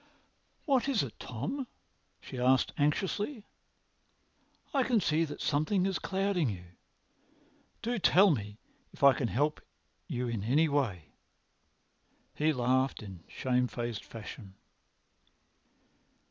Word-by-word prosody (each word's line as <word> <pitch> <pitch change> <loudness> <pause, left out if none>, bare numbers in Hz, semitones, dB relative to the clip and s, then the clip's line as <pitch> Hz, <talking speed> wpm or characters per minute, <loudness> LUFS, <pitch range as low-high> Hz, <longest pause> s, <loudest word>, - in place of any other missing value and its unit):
"What 275 -2 +2
is 245 - +2
it, 125 - -8
Tom?" 140 - -4 0.5
she 130 - -7
asked 130 +1 +3
anxiously. 200 - 0 1.3
"I 275 - +3
can 245 -3 +3
see 165 -3 +2
that 145 -2 -7
something 155 +6 +1
is 195 -1 0
clouding 190 -6 0
you. 90 -4 -5 1.2
Do 240 0 -1
tell 195 +1 +6
me 105 -6 -3 0.4
if - - -9
I 140 -1 +9
can 130 - -1
help 145 +9 0 0.5
you 125 0 -2
in 115 -4 -3
any 145 +9 +3
way." 115 - -1 1.2
He 155 +1 +2
laughed 130 -1 +1
in 95 -5 -10
shame 125 -1 0
faced 120 -3 -4
fashion. 105 -3 -9
140 Hz, 120 wpm, -31 LUFS, 120-190 Hz, 1.3 s, I